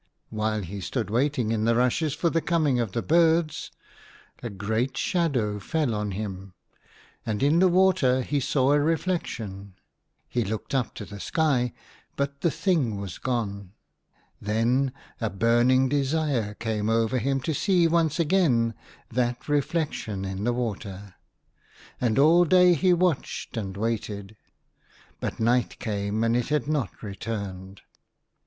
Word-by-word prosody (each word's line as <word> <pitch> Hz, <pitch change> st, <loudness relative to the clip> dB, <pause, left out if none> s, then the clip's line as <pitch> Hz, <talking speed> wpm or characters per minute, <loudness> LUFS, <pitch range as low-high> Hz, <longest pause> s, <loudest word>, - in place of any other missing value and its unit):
While 110 Hz, -1 st, -1 dB
he 100 Hz, +3 st, -6 dB
stood 110 Hz, +2 st, -3 dB
waiting 125 Hz, -2 st, +1 dB
in 110 Hz, -1 st, 0 dB
the 115 Hz, 0 st, +3 dB
rushes 130 Hz, +5 st, +1 dB
for 170 Hz, 0 st, 0 dB
the 165 Hz, -, +1 dB
coming 155 Hz, -7 st, +1 dB
of 115 Hz, -5 st, -2 dB
the 115 Hz, -, -1 dB
birds, 165 Hz, -1 st, +2 dB, 0.7 s
a 120 Hz, -, -4 dB
great 110 Hz, +6 st, -2 dB
shadow 130 Hz, -, 0 dB
fell 150 Hz, +1 st, -1 dB
on 105 Hz, -1 st, -2 dB
him, 95 Hz, -2 st, -6 dB, 0.7 s
and 110 Hz, +2 st, -2 dB
in 150 Hz, +4 st, +4 dB
the 185 Hz, -, +6 dB
water 175 Hz, -9 st, +3 dB
he 145 Hz, +3 st, -1 dB
saw 135 Hz, 0 st, +2 dB
a 145 Hz, -, +4 dB
reflection. 125 Hz, -, -2 dB, 0.5 s
He 120 Hz, -, -1 dB
looked 110 Hz, +5 st, -5 dB
up 130 Hz, -4 st, 0 dB
to 105 Hz, -, -6 dB
the 100 Hz, 0 st, -9 dB
sky; 135 Hz, -3 st, +1 dB, 0.4 s
but 140 Hz, 0 st, -3 dB
the 170 Hz, -, +3 dB
thing 145 Hz, -, 0 dB
was 100 Hz, -3 st, -6 dB
gone. 100 Hz, -6 st, -3 dB, 0.7 s
Then 120 Hz, +6 st, +1 dB, 0.3 s
a 115 Hz, -, -1 dB
burning 120 Hz, +6 st, +3 dB
desire 140 Hz, -6 st, 0 dB
came 110 Hz, -1 st, -2 dB
over 115 Hz, +2 st, +2 dB
him 135 Hz, +3 st, 0 dB
to 160 Hz, -, -1 dB
see 180 Hz, +3 st, +2 dB
once 165 Hz, -1 st, +1 dB
again 145 Hz, -10 st, +2 dB, 0.4 s
that 120 Hz, 0 st, -1 dB
reflection 145 Hz, -, -1 dB
in 95 Hz, +2 st, -4 dB
the 120 Hz, -, +2 dB
water, 105 Hz, -5 st, -5 dB, 0.9 s
and 120 Hz, -3 st, +1 dB
all 160 Hz, +5 st, +6 dB
day 180 Hz, +1 st, +5 dB
he 180 Hz, +3 st, +3 dB
watched 175 Hz, -8 st, 0 dB
and 100 Hz, -4 st, -4 dB
waited; 105 Hz, -2 st, -3 dB, 0.8 s
but -, -, -4 dB
night 120 Hz, +2 st, +1 dB
came, 105 Hz, 0 st, -2 dB
and 115 Hz, 0 st, +2 dB
it 120 Hz, -1 st, 0 dB
had 150 Hz, -1 st, 0 dB
not 150 Hz, -8 st, 0 dB
26 100 Hz, -3 st, -9 dB
THE 115 Hz, -, -2 dB
HUNTER. 100 Hz, -1 st, -3 dB, 0.2 s
returned. 95 Hz, +1 st, -14 dB
120 Hz, 150 wpm, -26 LUFS, 105-150 Hz, 0.9 s, the